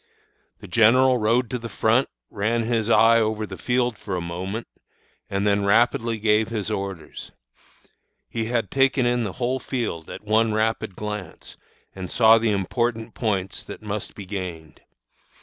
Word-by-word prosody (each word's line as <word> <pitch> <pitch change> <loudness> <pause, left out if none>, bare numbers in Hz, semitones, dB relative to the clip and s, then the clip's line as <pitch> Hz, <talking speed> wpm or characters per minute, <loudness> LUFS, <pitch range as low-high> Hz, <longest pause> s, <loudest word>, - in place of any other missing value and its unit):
"The - - -10
general 125 +3 +4
rode 115 +3 +2
to 125 - -2
the 115 0 -7
front, 115 +5 +2 0.2
ran 115 +3 0
his 115 -1 0
eye 115 0 +6
over 110 -1 0
the - - -8
field 125 -2 0
for 100 - -4
a - - -1
moment, 90 +6 -5 0.6
and 100 +1 -1
then 100 0 +2
rapidly 115 +2 +2
gave 105 0 +2
his 110 -2 -3
orders. 95 -6 -5 1.0
He 115 -1 -3
had 115 -4 -1
taken 135 -1 +2
in 120 0 +1
the 100 -4 -4
whole 130 +1 -1
field 115 -12 -4
at - - -8
one 110 +1 +2
rapid 110 -3 -1
glance, 105 -1 -7 0.4
and 95 -2 -7
saw 115 -1 +6
the 115 0 +1
important 110 +3 -1
points 95 -5 -2
that - - -9
must 105 0 -5
be 100 - -8
gained. 90 -5 -7
110 Hz, 160 wpm, -23 LUFS, 100-115 Hz, 1.0 s, eye